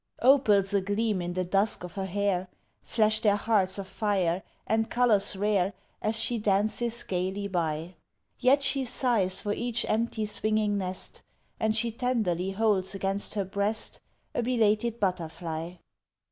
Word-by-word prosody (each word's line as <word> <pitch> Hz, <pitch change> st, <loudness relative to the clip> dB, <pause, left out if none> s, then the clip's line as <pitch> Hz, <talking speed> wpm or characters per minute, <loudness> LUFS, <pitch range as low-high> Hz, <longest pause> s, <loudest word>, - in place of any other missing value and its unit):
Opals 210 Hz, -7 st, +4 dB
agleam 205 Hz, +1 st, 0 dB
in 175 Hz, 0 st, -3 dB
the 185 Hz, +1 st, -1 dB
dusk 195 Hz, +2 st, +1 dB
of 180 Hz, -, -7 dB
her 190 Hz, -1 st, -3 dB
hair 190 Hz, -1 st, 0 dB, 0.3 s
Flash 215 Hz, -1 st, +2 dB
their 210 Hz, -2 st, +3 dB
hearts 205 Hz, -3 st, +1 dB
of 195 Hz, -1 st, -5 dB
fire 190 Hz, -5 st, 0 dB, 0.2 s
and 225 Hz, +1 st, 0 dB
colours 220 Hz, -5 st, +3 dB
rare 200 Hz, -1 st, +1 dB, 0.3 s
As 220 Hz, +1 st, +2 dB
she 230 Hz, +1 st, +1 dB
dances 215 Hz, +3 st, 0 dB
gaily 190 Hz, +2 st, -2 dB
by 165 Hz, -2 st, -2 dB, 0.5 s
Yet 270 Hz, +2 st, +4 dB
she 275 Hz, -1 st, +2 dB
sighs 235 Hz, -7 st, +1 dB
for 205 Hz, -1 st, -1 dB
each 240 Hz, +1 st, 0 dB
empty 220 Hz, 0 st, 0 dB
swinging 215 Hz, 0 st, +1 dB
nest, 185 Hz, -1 st, -5 dB, 0.4 s
And 220 Hz, -1 st, +1 dB
she 230 Hz, +1 st, 0 dB
tenderly 220 Hz, -7 st, -1 dB
holds 195 Hz, -2 st, +1 dB
against 195 Hz, +2 st, -2 dB
her 200 Hz, -2 st, 0 dB
breast 200 Hz, +3 st, -1 dB, 0.3 s
A -, -, 0 dB
belated 230 Hz, -1 st, +1 dB
butterfly. 170 Hz, -3 st, -3 dB
205 Hz, 145 wpm, -28 LUFS, 190-225 Hz, 0.5 s, Opals